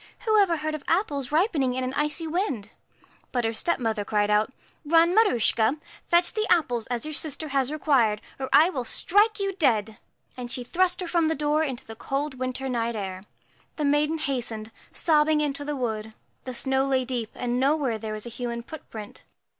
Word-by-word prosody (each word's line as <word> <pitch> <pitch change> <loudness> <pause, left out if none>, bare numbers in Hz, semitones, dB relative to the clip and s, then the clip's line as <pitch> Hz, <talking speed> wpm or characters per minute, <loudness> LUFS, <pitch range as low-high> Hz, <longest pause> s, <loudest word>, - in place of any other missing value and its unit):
Who 435 -1 +3
ever 345 -4 +2
heard 310 0 -3
of 305 -2 -5
apples 285 - 0
ripening 300 - +2
in 260 - -1
an 255 +1 -3
icy 300 +3 0
wind? 310 - -2 0.3
' - - -32
But 245 -2 0
her 225 - 0
stepmother 225 -6 0
cried 210 0 +1
put, 210 +4 +2 0.2
' - - -34
Run, 330 +3 +4
Maruschka, 255 - +3 0.3
fetch 345 +1 +3
the 430 -1 -1
apples 245 -9 +2
as 245 +2 -2
your 310 - -5
sister 310 +1 -3
has 270 -1 +1
required, 260 -9 +2 0.2
or 265 -1 -3
I 330 +4 +6
will 255 -7 -3
strike 415 - +3
you 395 -1 -1
dead.' 225 - +1 0.4
And 250 -1 -6
she 250 - -3
thrust 360 +7 +1
her 360 - -3
from 335 -2 +2
the 320 - +1
door 295 +2 +1
into 265 -6 -4
the 225 - -9
cold 275 +2 -3
winter 260 +1 -3
night 235 -2 -1
air. 190 -3 -5 0.5
The 300 - -1
maiden 295 +2 +2
hastened, 235 -7 -2 0.2
sobbing, 310 -1 +3
into 290 -1 -1
the 295 0 -3
wood; 220 -4 -3 0.3
the 255 -1 -5
snow 265 +2 +1
lay 260 -2 +1
deep, 240 -4 -3
and 245 0 -1
nowhere 280 -1 +2
was - - -21
there 215 -1 -4
a - - -5
human 235 -1 -4
footprint. 225 -7 -10
270 Hz, 195 wpm, -26 LUFS, 235-315 Hz, 0.5 s, I